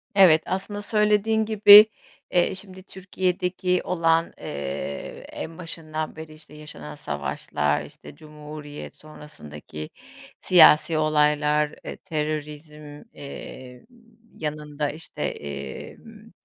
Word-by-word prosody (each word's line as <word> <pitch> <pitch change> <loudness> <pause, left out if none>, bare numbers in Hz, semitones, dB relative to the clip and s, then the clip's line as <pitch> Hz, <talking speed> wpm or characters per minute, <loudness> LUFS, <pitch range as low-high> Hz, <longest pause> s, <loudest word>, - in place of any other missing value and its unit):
Evet, 175 -5 +7
aslında, 205 +2 -3
söylediğin 210 +1 +2
gibi, 210 -1 +9 0.5
eee, 175 0 +2
şimdi 190 -1 -11
Türkiye'deki 185 -1 -2
olan, 165 -2 +1
eee, 70 0 -6
en 160 0 -7
başından 155 -2 -6
beri, 160 -1 -10
işte, 155 -1 -17
yaşanan 80 - -10
savaşlar, 75 0 -2
işte, - - -13
Cumhuriyet 150 -1 -10
sonrasındaki 75 - -11 0.5
siyasi 165 -2 +6
olaylar, 150 -1 +2
eee, - - -6
terörizm, 150 -2 -6
eee, 130 -2 -10 0.5
yanında, 150 -1 -4
işte, 155 +3 -9
emm, 70 -2 -7
155 Hz, 95 wpm, -24 LUFS, 145-180 Hz, 0.5 s, gibi